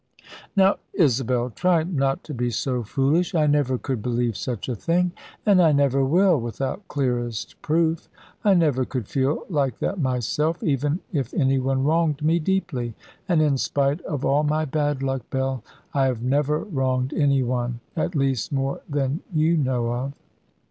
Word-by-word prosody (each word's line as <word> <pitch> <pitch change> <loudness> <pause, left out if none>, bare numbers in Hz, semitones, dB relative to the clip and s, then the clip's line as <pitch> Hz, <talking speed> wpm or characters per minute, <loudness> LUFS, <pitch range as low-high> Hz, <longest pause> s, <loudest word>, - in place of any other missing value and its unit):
"Now, 195 0 +4 0.2
Isabel, 125 - +2
try 170 - +2
not 140 -6 -1
to 150 - -7
be 125 -1 -1
so 125 +2 -1
foolish. 140 - +1
I 155 -2 +3
never 145 -3 +2
could 130 -3 -3
believe 120 -1 -1
such 115 +4 -4
a 125 - -1
thing, 175 - +1 0.3
and 200 -4 +5
I 165 -3 +5
never 140 -1 +3
will, 175 +3 +4
without 130 - -4
clearest 120 -5 -2
proof. 160 +1 0 0.3
I 200 -2 +5
never 150 -7 +2
could 125 -4 -4
feel 135 +2 0
like 140 - 0
that 195 - -2
myself, 135 - 0
even 145 - 0
if 135 -6 -2
any 135 -3 +2
one 135 0 0
wronged 155 -1 +1
me 165 +2 +3
deeply. 145 - -1 0.3
And 165 -3 +4
in 140 -3 +2
spite 140 +5 0
of 145 -4 -4
all 140 +2 +3
my 155 +1 +1
bad 145 -1 -1
luck, 135 -1 -2
Bell, 130 -2 -2 0.3
I 135 -2 +3
have 120 -3 -2
never 145 +3 +1
wronged 130 -7 -1
any 140 -3 +2
one. 120 -1 -2 0.2
At 170 +2 -1
least 135 -5 0
more 135 -1 -1
than 140 +1 -1
you 160 0 +2
know 125 -5 0
of." 130 +3 -3
140 Hz, 170 wpm, -24 LUFS, 130-155 Hz, 0.3 s, and